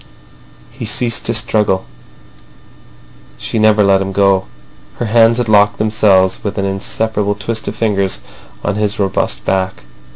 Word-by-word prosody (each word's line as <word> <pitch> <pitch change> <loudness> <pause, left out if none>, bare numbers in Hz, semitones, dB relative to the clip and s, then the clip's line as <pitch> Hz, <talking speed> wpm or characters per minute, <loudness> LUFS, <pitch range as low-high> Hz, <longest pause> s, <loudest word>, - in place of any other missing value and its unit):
He - - -7
ceased 120 -2 -1
to 115 - 0
struggle; 105 -4 0 1.5
she 110 - -3
never 110 -1 +4
let 100 -1 +3
him 95 0 -3
go. 100 -1 +2 0.5
Her 120 - -3
hands 115 +1 +4
had 120 -2 -1
locked 105 -1 +4
themselves 105 -3 +2
with 100 0 -4
an 100 - 0
inseparable 105 +1 -2
twist 110 +3 -4
of 105 - -4
fingers 100 -4 0 0.4
on 105 0 -1
his 105 +1 -1
robust 95 -1 -1
back. 95 -7 -1
105 Hz, 140 wpm, -15 LUFS, 95-110 Hz, 1.5 s, never